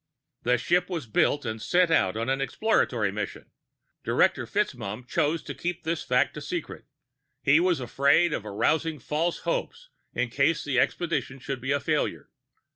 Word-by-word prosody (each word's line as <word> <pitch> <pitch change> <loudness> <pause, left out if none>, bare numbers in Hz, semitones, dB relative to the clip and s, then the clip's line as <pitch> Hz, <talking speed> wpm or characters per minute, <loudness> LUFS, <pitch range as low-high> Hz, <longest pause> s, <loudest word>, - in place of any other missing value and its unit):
"The 125 +1 +2
ship 175 +11 +1
was 170 -7 -3
built 130 +5 +1
and 110 -1 -4
sent 175 +4 +3
out 95 -9 +2
on 115 +2 -2
an 135 +1 0
exploratory 125 - +1
mission. 100 0 -6 0.5
Director - - +2
FitzMaugham 110 +5 -2
chose 155 +5 0
to - - -6
keep 180 0 -4
this 165 0 -1
fact - - +1
a - - -6
secret. - - -5 0.6
He 140 +5 +5
was 175 -2 +2
afraid 140 +7 +3
of - - -2
arousing 155 +10 0
false 155 +6 -1
hopes - - -3 0.3
in 125 -1 -1
case 140 +5 +2
the 135 -3 +1
expedition 150 -3 -1
should 135 -1 -5
be 135 +2 -2
a 140 - +2
failure. - - -1
140 Hz, 165 wpm, -27 LUFS, 125-170 Hz, 0.6 s, He